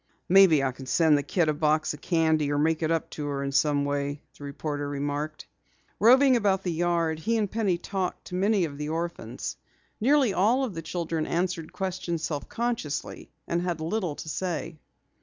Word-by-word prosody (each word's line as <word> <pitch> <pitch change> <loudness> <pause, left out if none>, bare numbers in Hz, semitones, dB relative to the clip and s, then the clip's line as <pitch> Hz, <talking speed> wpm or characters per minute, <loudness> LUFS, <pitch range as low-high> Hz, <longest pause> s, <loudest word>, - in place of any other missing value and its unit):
"Maybe 180 -6 +6
I 135 - +1
can 130 +1 -11
send 160 +2 +4
the 145 - +2
kid 165 +3 0
a 155 - +2
box 155 +1 +1
of 150 - -11
candy 160 -4 +2
or 145 - +1
make 160 +2 +1
it 160 - 0
up 165 -1 -1
to 150 -1 -5
her 140 -1 -2
in 140 - -2
some 145 0 +2
way," 145 0 -2
the - - -12
reporter 145 0 -4
remarked. 145 +2 -3 0.5
Roving 260 +3 +6
about 195 -4 +1
the 180 - -1
yard, 165 -1 0
he 230 +8 0
and 210 -3 -1
Penny 205 -6 +1
talked 185 +1 -4
to - - -10
many 195 0 +2
of 145 -2 -8
the 150 0 -3
orphans. 160 -8 -4 0.4
Nearly 265 -2 +3
all 225 +9 +3
of 245 -7 -3
the 165 - -5
children 165 -1 -3
answered 170 -2 -2
questions 180 -4 -3
self 145 -3 -3
consciously 230 -12 -3 0.2
and 170 0 0
had 175 -2 -2
little 170 -1 -2
to - - -8
say. 165 -1 -3
165 Hz, 195 wpm, -27 LUFS, 150-185 Hz, 0.5 s, Maybe